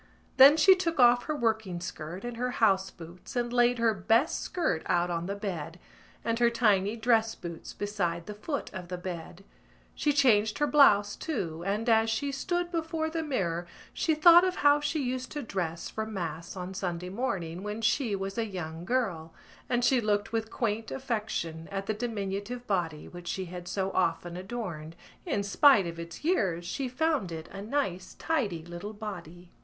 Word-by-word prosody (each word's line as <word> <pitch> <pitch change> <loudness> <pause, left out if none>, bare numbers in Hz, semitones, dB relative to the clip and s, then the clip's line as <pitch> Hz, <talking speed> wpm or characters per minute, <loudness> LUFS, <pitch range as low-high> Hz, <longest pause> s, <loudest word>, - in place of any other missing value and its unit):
Then 275 +3 +9
she 350 +5 +8
took 345 -5 -2
off 245 0 +6
her 305 - -2
working 220 -8 -1
skirt 170 +2 -6
and 240 -1 -5
her 250 +1 -1
house 195 -4 +3
boots 175 +7 -12
and 240 0 -1
laid 245 0 +4
her 230 -1 +3
best 225 - +2
skirt 320 - -1
out 175 0 +1
on 170 0 -2
the 200 - -2
bed 180 -5 -5 0.5
and 230 0 0
her 240 -1 +5
tiny 210 -3 +2
dress 225 -1 +2
boots 170 -2 -8
beside 175 -5 -2
the 210 - -6
foot 275 +7 -4
of 185 -2 -7
the 180 0 -4
bed. 175 0 -7 0.5
She 295 - +1
changed 220 -7 +3
her 295 - +2
blouse 205 -9 +5
too 175 - -4
and, 210 +4 -1
as 225 -1 +4
she 245 +6 -1
stood 350 +5 -2
before 320 -1 -2
the 325 0 -1
mirror, 175 - -2 0.3
she 320 - +1
thought 340 +3 +8
of 370 0 +1
how 290 0 +7
she 295 0 -1
used 255 0 -3
to 295 -2 -4
dress 175 -6 -3
for 220 0 -3
mass 170 -5 -5
on 185 0 -5
Sunday 180 -2 -3
morning 185 -6 -3
when 210 +2 -4
she 225 0 +1
was 195 +2 -4
a 230 - +1
young 170 -4 -6
girl; 190 -10 -1 0.3
and 245 -1 +2
she 255 -1 +4
looked 205 -2 0
with 225 -1 -1
quaint 225 -2 -2
affection 215 -11 -3
at 195 0 -3
the 215 - -1
diminutive 215 +1 -4
body 170 -7 -2
which 175 -1 -10
she 190 +2 -2
had 175 0 -8
so 190 +1 -1
often 175 -1 0
adorned. 180 -5 -6 0.3
In 210 -11 0
spite 210 - +5
of 170 0 -6
its 170 - -8
years 190 - +1
she 260 +8 -3
found 280 - 0
it 160 0 -6
a 195 - -8
nice 200 -6 -2
tidy 210 - -1
little 175 +5 -7
body. 180 -5 -8
210 Hz, 185 wpm, -29 LUFS, 175-245 Hz, 0.5 s, Then